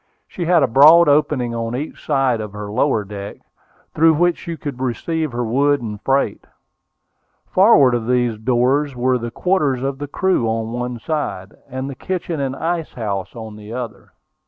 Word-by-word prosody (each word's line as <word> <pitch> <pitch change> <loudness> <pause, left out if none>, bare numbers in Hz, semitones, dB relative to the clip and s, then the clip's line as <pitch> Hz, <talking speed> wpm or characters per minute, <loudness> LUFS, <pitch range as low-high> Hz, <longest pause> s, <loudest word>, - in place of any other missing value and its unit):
She 175 - -5
had 170 -3 +4
a - - +3
broad 155 +7 +7
opening 145 -4 +2
on 115 0 -3
each 145 +5 -6
side 135 -6 +1
of 105 -2 -7
her 105 0 -6
lower 115 -1 +1
deck, 100 0 -8 0.6
through 160 0 +4
which 175 +2 +2
she 170 -1 -6
could 140 -5 -6
receive 155 +5 -2
her 120 +1 -2
wood 140 +5 +2
and 105 -3 -6
freight. 135 -6 0 1.0
Forward 185 - +5
of 115 -2 -2
these 120 -3 +1
doors 130 +4 +1
were 125 +1 +1
the 120 0 -4
quarters 145 -3 0
for 135 +1 0
the 140 +1 -7
crew 180 -5 0
on 110 0 -2
one 120 0 -3
side, 115 - -4 0.2
and 130 +1 -4
the 140 - -5
kitchen 175 +2 -4
and 135 -1 -2
ice 165 0 -3
house 100 -4 -4
on 110 -2 -8
the 105 +1 -10
other. 125 -1 -7
130 Hz, 180 wpm, -19 LUFS, 115-150 Hz, 1.0 s, broad